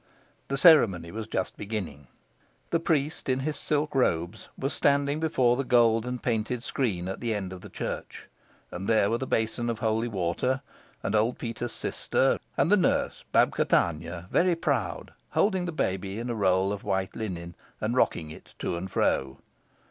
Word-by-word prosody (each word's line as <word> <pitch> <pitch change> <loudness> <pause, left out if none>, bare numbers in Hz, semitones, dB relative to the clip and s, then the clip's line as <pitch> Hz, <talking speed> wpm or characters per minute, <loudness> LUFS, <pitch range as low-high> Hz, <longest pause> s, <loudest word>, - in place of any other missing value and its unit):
The 140 - -1
ceremony 110 - +6
was 110 +1 -5
just 95 -4 -2
beginning. 95 - -5 0.6
The 165 - +3
priest, 155 -3 0
in 130 0 +1
his 150 +2 -2
silk 150 0 0
robes, 85 -10 0
was 135 +3 -2
standing 140 +1 +2
before 130 -7 +2
the 135 - -1
gold 115 -2 +3
and 125 -1 -4
painted 115 +1 -1
screen 100 -12 -1
at 95 - -4
the 115 -2 -1
end 95 -2 -4
of 90 - -9
the - - -10
church, - - -6 0.4
and 95 +2 -5
there 110 -2 +3
were 115 - +1
the 130 - -3
basin 115 +1 0
of 115 - -1
holy 110 0 0
water, 110 +6 -1 0.4
and 100 - -1
old 110 +3 +2
Peter's 120 0 -4
sister, - - 0 0.2
and 170 - +3
the 210 - +7
nurse 185 - +1
Babka - - +3
Tanya, 85 +2 0
very 180 0 +3
proud, 165 - -2 0.2
holding 190 -3 +1
the - - -2
baby 95 - -2
in 120 +1 -3
a - - -1
roll 95 -1 +2
of 100 - -6
white 95 -2 -1
linen, 85 -6 -5 0.3
and 110 +3 -1
rocking 80 -10 +1
it - - -13
to - - -2
and 90 +3 -5
fro. 65 -6 0
115 Hz, 180 wpm, -27 LUFS, 95-130 Hz, 0.6 s, the